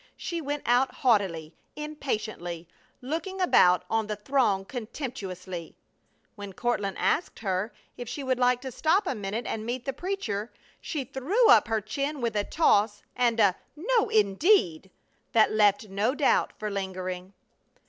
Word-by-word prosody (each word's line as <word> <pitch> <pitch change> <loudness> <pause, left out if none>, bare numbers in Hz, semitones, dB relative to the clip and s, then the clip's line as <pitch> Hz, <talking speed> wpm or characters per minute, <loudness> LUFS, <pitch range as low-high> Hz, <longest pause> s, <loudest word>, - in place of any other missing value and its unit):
She 340 -2 -4
went 290 0 -3
out 245 +2 +3
haughtily, 190 -10 +1 0.2
impatiently, 215 - -4 0.4
looking 330 +8 -4
about 180 - +4
on 225 -1 0
the 210 - -2
throng 210 -3 +1
contemptuously. 195 - -6 0.6
When 200 -2 -8
Courtland 205 -3 -1
asked 350 - 0
her 195 +1 -2 0.3
if 245 -2 -6
she 285 - -5
would 260 -1 0
like 250 0 +3
to 260 -1 -6
stop 335 - +2
a 355 - -1
minute 215 +1 -4
and 215 - -3
meet 240 +2 -4
the 270 - -2
preacher 255 - -3 0.3
she 295 -5 -4
threw 345 - +1
up - - +6
her 225 -1 0
chin 275 +7 -3
with 235 -3 -2
a 205 - +1
toss 205 -8 +2
and 240 -2 +2
a 200 -4 +5 0.2
"No, 445 +8 +1
indeed!" 200 - +3 0.4
that 220 -1 +5
left 210 0 +3
no 205 +7 0
doubt 290 - +2
for 215 -1 -4
lingering. 185 -1 -4
225 Hz, 150 wpm, -27 LUFS, 200-275 Hz, 0.6 s, up